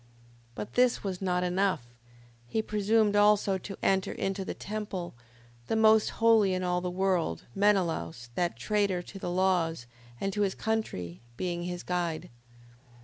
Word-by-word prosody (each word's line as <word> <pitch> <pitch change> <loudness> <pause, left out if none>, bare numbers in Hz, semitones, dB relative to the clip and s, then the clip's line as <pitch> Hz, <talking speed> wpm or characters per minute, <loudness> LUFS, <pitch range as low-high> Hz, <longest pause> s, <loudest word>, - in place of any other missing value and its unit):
5:15. 120 - -28 0.5
But 105 +1 -6
this 250 -1 +3
was 190 -2 -4
not 180 -1 +1
enough, 185 -6 +1 0.6
he 220 - -1
presumed 210 0 +2
also 205 -2 +4
to 195 +2 -8
enter 190 -1 +2
into 195 0 -2
the - - -5
temple, 205 -4 -5 0.5
the - - 0
most 220 0 +5
holy 220 -4 +4
in 185 - -2
all 180 0 0
the 180 - -2
world 180 - 0
Menelaus, 165 - 0
that 175 +6 -1
traitor 200 -4 0
to 195 - -10
the 175 - -4
laws, 175 -6 +1 0.3
and 195 0 -2
to 210 - -1
his 195 -2 +1
country, 95 - -3 0.2
being 175 -1 -2
his 175 0 -4
guide. 175 -5 -2
190 Hz, 155 wpm, -29 LUFS, 175-205 Hz, 0.6 s, most